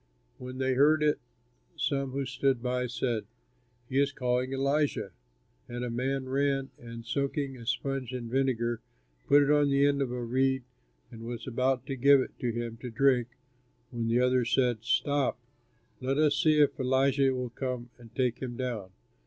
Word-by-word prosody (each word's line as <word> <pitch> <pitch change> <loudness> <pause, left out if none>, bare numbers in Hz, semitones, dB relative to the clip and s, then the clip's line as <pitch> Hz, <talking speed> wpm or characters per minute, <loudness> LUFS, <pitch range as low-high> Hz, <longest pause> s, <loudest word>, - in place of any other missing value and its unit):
When 125 0 -7
they 130 0 +1
heard 150 +4 +4
it, 150 -1 +2 0.6
some 140 -2 0
who 135 +1 -2
stood 130 0 +1
by, 125 0 0
said, 120 -3 -2 0.6
"He 130 +2 0
is 140 0 +3
calling 125 -1 -1
Elijah." 140 -6 0 0.6
And 120 0 -4
a 120 - -3
man 130 +2 -1
ran 135 0 0
and, 115 -1 -9
soaking 140 +2 -2
a 115 -2 -11
sponge 130 +1 -2
in 125 -2 -5
vinegar, 120 -2 0 0.5
put 145 +1 +6
it 140 - +2
on 145 -1 +4
the 140 0 +4
end 140 -1 +2
of 130 -3 -1
a 125 -1 -3
reed 130 +2 +1 0.5
and 115 -2 -10
was 120 0 -6
about 130 +1 0
to 135 -1 -3
give 140 +2 +6
it 130 - -2
to 120 - -1
him 115 0 -4
to 125 +2 -7
drink 125 0 +3 0.6
when 115 -2 -2
the 115 +1 +2
others 125 -1 +2
said, 125 -4 +2
"Stop, 140 +3 +1 0.6
let 135 +2 -1
us 150 -1 +3
see 155 +1 +3
if 145 -1 +3
Elijah 135 +1 +3
will 125 -2 -3
come 125 -1 -4
to 120 -2 -14
take 125 -2 0
him 120 -2 -5
down." 120 -7 -3
130 Hz, 180 wpm, -29 LUFS, 120-140 Hz, 0.6 s, put